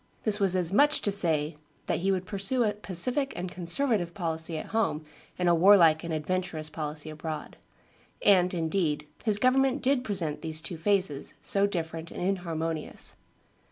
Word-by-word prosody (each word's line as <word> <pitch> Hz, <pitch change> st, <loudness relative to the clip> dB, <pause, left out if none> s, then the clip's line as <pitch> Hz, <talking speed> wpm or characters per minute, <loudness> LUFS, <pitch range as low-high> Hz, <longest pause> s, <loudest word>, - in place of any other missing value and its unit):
This 210 Hz, -1 st, +1 dB
was 195 Hz, -2 st, +2 dB
as 180 Hz, 0 st, +1 dB
much 290 Hz, +6 st, +5 dB
as -, -, 0 dB
to 205 Hz, -, +1 dB
say 160 Hz, -6 st, +3 dB, 0.3 s
that -, -, -1 dB
he 195 Hz, +3 st, +1 dB
would 185 Hz, -1 st, -1 dB
pursue 200 Hz, +6 st, 0 dB
a 210 Hz, -2 st, +1 dB
pacific 230 Hz, -, -1 dB
and 175 Hz, 0 st, -5 dB
conservative 180 Hz, 0 st, -1 dB
policy 160 Hz, -2 st, -2 dB
at -, -, -7 dB
home 195 Hz, -9 st, 0 dB, 0.3 s
and 180 Hz, -, 0 dB
a 175 Hz, -, +5 dB
warlike 170 Hz, -3 st, +6 dB
and 170 Hz, -, -5 dB
adventurous 160 Hz, 0 st, -3 dB
policy 150 Hz, 0 st, -5 dB
abroad. 155 Hz, 0 st, -6 dB, 0.7 s
And, 180 Hz, -3 st, +5 dB
indeed, 160 Hz, -3 st, -1 dB, 0.2 s
his 215 Hz, -3 st, +1 dB
government 265 Hz, +3 st, +2 dB
did 265 Hz, -1 st, +2 dB
present 185 Hz, -9 st, -1 dB
these 160 Hz, -1 st, -1 dB
two 170 Hz, +1 st, -5 dB
phases, 180 Hz, -5 st, 0 dB
so 200 Hz, 0 st, +3 dB
different 165 Hz, -3 st, -5 dB
and -, -, -8 dB
inharmonious. 165 Hz, -4 st, -3 dB
180 Hz, 165 wpm, -28 LUFS, 160-205 Hz, 0.7 s, warlike